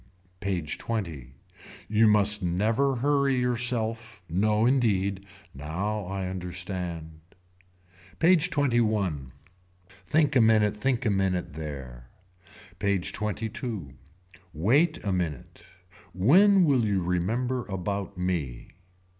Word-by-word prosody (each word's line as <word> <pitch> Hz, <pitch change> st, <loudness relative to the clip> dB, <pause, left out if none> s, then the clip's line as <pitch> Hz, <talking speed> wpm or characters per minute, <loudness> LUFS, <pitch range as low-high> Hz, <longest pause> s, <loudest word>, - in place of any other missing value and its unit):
PAGE 90 Hz, -6 st, -3 dB
XX. 80 Hz, -, -4 dB, 0.5 s
You 110 Hz, +1 st, +4 dB
must 105 Hz, 0 st, +3 dB
never 110 Hz, +10 st, +1 dB
hurry 140 Hz, +1 st, +2 dB
yourself. 115 Hz, -4 st, -1 dB
No 105 Hz, +6 st, +1 dB
indeed. 100 Hz, -6 st, +1 dB, 0.3 s
Now 95 Hz, +9 st, -3 dB
I 95 Hz, 0 st, -3 dB
understand. 90 Hz, -3 st, -5 dB, 1.0 s
PAGE 175 Hz, 0 st, +4 dB
XXI. 110 Hz, -, 0 dB, 0.6 s
Think 145 Hz, -, 0 dB
a 125 Hz, -, +6 dB
minute 110 Hz, -2 st, +4 dB
think 125 Hz, +3 st, -1 dB
a 110 Hz, -, +3 dB
minute 95 Hz, -4 st, -1 dB
there. 65 Hz, -6 st, -8 dB, 0.7 s
PAGE 100 Hz, -3 st, 0 dB
XXII. 105 Hz, -, -4 dB, 0.6 s
Wait 140 Hz, -, +3 dB
a 100 Hz, -, -1 dB
minute. 85 Hz, -7 st, -4 dB, 0.5 s
When 180 Hz, -, +5 dB
will 135 Hz, -6 st, +3 dB
you 100 Hz, -4 st, 0 dB
remember 115 Hz, +9 st, -1 dB
about 100 Hz, 0 st, -4 dB
me. 85 Hz, -10 st, -3 dB
100 Hz, 100 wpm, -27 LUFS, 90-120 Hz, 1.0 s, a